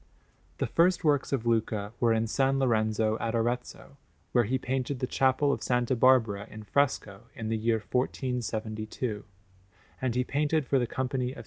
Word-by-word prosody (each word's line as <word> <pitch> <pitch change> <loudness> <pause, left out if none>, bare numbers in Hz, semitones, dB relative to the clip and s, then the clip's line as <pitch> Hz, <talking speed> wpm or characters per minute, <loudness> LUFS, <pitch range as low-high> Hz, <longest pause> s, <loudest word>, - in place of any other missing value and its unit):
The - - 0
first 175 +1 +2
works 145 -3 +2
of 130 -4 -1
Luca 110 -2 0
were 120 -2 +3
in 110 0 +2
S. 115 +4 -4
Lorenzo 110 -5 +2
at 115 0 -2
Arezzo, 120 +4 -3 0.3
where 120 -2 +3
he 130 +5 0
painted 130 +1 -2
the 130 - -1
Chapel 135 +2 +2
of - - -3
S. 125 -1 0
Barbara 115 -5 +3
in 110 0 -9
fresco 105 -5 -1
in 110 -1 -4
the 115 - 0
year 110 +1 +1
1472; 110 -3 -2 0.8
and 130 -2 -1
he 125 - +2
painted 150 +2 0
for 135 +1 +2
the 120 - 0
Company 130 0 -2
of - - -13
S. - - -8
125 Hz, 175 wpm, -28 LUFS, 110-130 Hz, 0.8 s, were